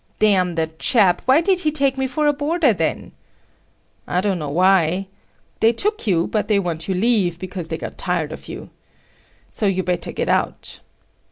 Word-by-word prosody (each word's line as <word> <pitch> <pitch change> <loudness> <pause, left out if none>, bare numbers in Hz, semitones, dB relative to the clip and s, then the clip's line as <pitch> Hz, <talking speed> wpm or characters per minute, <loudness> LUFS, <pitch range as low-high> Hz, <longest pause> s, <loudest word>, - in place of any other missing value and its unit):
"Damn 185 -5 +2
the 160 -1 +1
chap! 195 -8 +3
Why 265 +5 +5
did 370 +1 +2
he 310 -4 +1
take 275 -3 +1
me 265 0 -1
for 300 +4 -1
a 295 - +3
boarder 295 -2 +1
then!" 160 -5 -3 1.0
"I 180 - 0
don't 190 -2 -1
know 150 -2 -4
why. 185 +2 +2 0.5
They 225 +1 +4
took 420 - -1
you 170 -4 +2
but 215 - -2
they 210 - +2
want 170 -4 -3
you 190 - -1
leave 190 -4 +1
because 180 -1 -6
they 160 0 -4
got - - -8
tired - - -1
of - - -9
you. - - -9 0.8
So 210 - -1
you'd 185 -2 0
better 175 -1 -2
get - - -3
out." - - -2
195 Hz, 185 wpm, -20 LUFS, 175-265 Hz, 1.0 s, Why